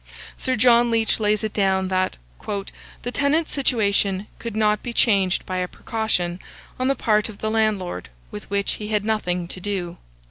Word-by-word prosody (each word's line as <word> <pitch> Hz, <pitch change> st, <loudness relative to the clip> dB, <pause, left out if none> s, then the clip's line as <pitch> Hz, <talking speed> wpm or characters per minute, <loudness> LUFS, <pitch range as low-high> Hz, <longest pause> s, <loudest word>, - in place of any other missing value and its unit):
Sir 260 Hz, -1 st, -1 dB
John 240 Hz, +1 st, +5 dB
Leach 225 Hz, -1 st, +2 dB
lays 210 Hz, 0 st, +1 dB
it 215 Hz, -, -2 dB
down, 190 Hz, -2 st, +2 dB
that 185 Hz, 0 st, 0 dB, 0.9 s
"the 245 Hz, -, -2 dB
tenant's 290 Hz, +4 st, +1 dB
situation 205 Hz, -7 st, +1 dB
could 230 Hz, -2 st, -5 dB
not 210 Hz, -1 st, +2 dB
be 240 Hz, -, -5 dB
changed 195 Hz, -5 st, +2 dB
by 185 Hz, -, -3 dB
a 180 Hz, 0 st, 0 dB
precaution, 180 Hz, -5 st, -2 dB, 0.4 s
on 255 Hz, -, +1 dB
the 275 Hz, -, +2 dB
part 215 Hz, -3 st, +2 dB
of 210 Hz, -, -10 dB
the 215 Hz, +1 st, -2 dB
landlord, 210 Hz, -, 0 dB, 0.2 s
with 105 Hz, -, -8 dB
which 200 Hz, 0 st, 0 dB
he 210 Hz, -, -4 dB
had 210 Hz, -1 st, 0 dB
nothing 180 Hz, -5 st, 0 dB
to 185 Hz, -, -6 dB
do." 180 Hz, -3 st, -3 dB
210 Hz, 175 wpm, -23 LUFS, 190-225 Hz, 0.9 s, John